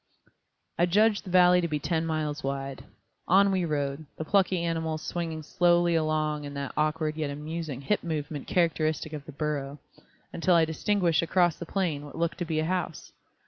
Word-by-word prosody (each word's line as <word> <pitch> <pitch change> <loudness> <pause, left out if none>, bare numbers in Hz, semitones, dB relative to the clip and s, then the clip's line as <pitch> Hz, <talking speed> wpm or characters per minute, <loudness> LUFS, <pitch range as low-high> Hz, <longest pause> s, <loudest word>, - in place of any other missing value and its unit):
I 175 - +4
judged 210 +4 +3
the - - -7
valley 180 0 +6
to 170 - 0
be 155 -2 -1
ten 160 +2 -1
miles 155 -2 -2
wide. 135 0 -4 0.4
On 195 +2 +5
we 185 -2 +1
rode, 145 -1 -2
the 160 - -4
plucky 185 -2 +2
animals 160 -2 -2
swinging 165 -2 -4
slowly 175 +2 +3
along 155 -2 0
in 145 0 -7
that 140 -1 -4
awkward 155 0 0
yet 155 -2 -1
amusing 150 -1 -5
hip 205 +9 0
movement 150 -3 -4
characteristic 155 -2 0
of 145 -2 -6
the - - -9
burro, 145 -1 -3 0.6
until 180 +1 +2
I 165 -1 +5
distinguished 170 0 +1
across 175 0 +2
the 170 - -7
plain 165 -7 -1
what 145 - -10
looked 170 0 -1
to 175 - -1
be 160 -1 -2
a 155 - 0
house. 175 -3 -3
160 Hz, 185 wpm, -28 LUFS, 150-175 Hz, 0.6 s, valley